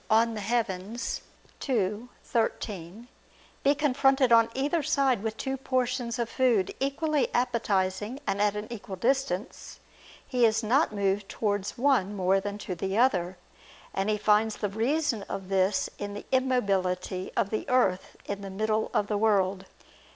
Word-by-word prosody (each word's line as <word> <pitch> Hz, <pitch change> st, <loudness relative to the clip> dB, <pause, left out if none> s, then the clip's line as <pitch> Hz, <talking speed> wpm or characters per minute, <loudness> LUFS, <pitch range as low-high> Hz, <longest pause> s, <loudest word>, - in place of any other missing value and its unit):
De 215 Hz, -, +5 dB
Coelo 220 Hz, -1 st, -2 dB, 0.5 s
ii, 215 Hz, -1 st, 0 dB, 0.2 s
13), 215 Hz, -2 st, -2 dB, 0.5 s
be 280 Hz, +1 st, +3 dB
confronted 270 Hz, -2 st, +3 dB
on 230 Hz, 0 st, +6 dB
either 290 Hz, +5 st, +1 dB
side 270 Hz, -6 st, +2 dB
with 220 Hz, 0 st, -3 dB
two 265 Hz, 0 st, -2 dB
portions 255 Hz, -2 st, -1 dB
of 235 Hz, -1 st, -1 dB
food 230 Hz, -6 st, +1 dB
equally 290 Hz, +2 st, 0 dB
appetizing 210 Hz, -1 st, 0 dB
and 195 Hz, -3 st, -1 dB
at 210 Hz, 0 st, +2 dB
an 210 Hz, +1 st, -4 dB
equal 200 Hz, -3 st, -7 dB
distance, 230 Hz, -2 st, -2 dB, 0.5 s
he 250 Hz, -2 st, +1 dB
is 225 Hz, 0 st, +3 dB
not 255 Hz, +7 st, +3 dB
moved 200 Hz, -1 st, -1 dB
towards 205 Hz, -2 st, -2 dB
one 240 Hz, -7 st, +2 dB
more 190 Hz, 0 st, +2 dB
than 200 Hz, +1 st, -4 dB
to 200 Hz, -, -5 dB
the 190 Hz, +3 st, -2 dB
other; 190 Hz, -7 st, +2 dB, 0.6 s
and 195 Hz, +2 st, -1 dB
he 210 Hz, -, +1 dB
finds 210 Hz, +1 st, +3 dB
the 205 Hz, -, -2 dB
reason 235 Hz, +3 st, 0 dB
of 195 Hz, -1 st, -5 dB
this 190 Hz, 0 st, +2 dB
in 205 Hz, 0 st, -5 dB
the 205 Hz, -, -7 dB
immobility 195 Hz, -8 st, 0 dB
of 200 Hz, -, +1 dB
the 215 Hz, -, -3 dB
earth 220 Hz, -8 st, +1 dB
in 200 Hz, 0 st, -4 dB
the 195 Hz, -, -6 dB
middle 215 Hz, +3 st, -1 dB
of 205 Hz, -, +3 dB
the 205 Hz, 0 st, -1 dB
world. 195 Hz, -3 st, +2 dB
215 Hz, 150 wpm, -28 LUFS, 195-250 Hz, 0.6 s, on